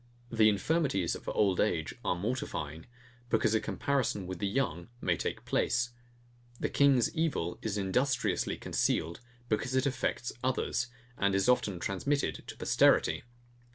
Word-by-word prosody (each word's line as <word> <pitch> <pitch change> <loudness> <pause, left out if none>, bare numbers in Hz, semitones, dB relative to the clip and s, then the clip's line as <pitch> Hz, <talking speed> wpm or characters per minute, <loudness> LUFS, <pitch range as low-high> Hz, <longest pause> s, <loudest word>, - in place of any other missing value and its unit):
The 110 -2 +5
infirmities 105 - +1
of - - -6
old 95 -4 +2
age - - +1
are - - +1
mortifying; 85 - -4 0.4
because 115 -1 +2
a 110 - +4
comparison 125 -8 -1
with 90 -1 -6
the 100 - 0
young 100 - -1
may 90 -8 +1
take - - -4
place. 125 0 +1 0.7
The - - -1
king's 135 -5 +4
evil 155 - -1
is 105 -2 -2
industriously 125 +8 0
concealed, 85 +5 0 0.3
because 125 +4 -1
it 130 +1 +2
affects 125 -2 -1
others, 125 -1 0 0.3
and 100 -1 +2
is 95 +3 +2
often 105 -6 +2
transmitted 140 +11 -1
to - - -8
posterity. - - +3
110 Hz, 140 wpm, -31 LUFS, 95-130 Hz, 0.7 s, The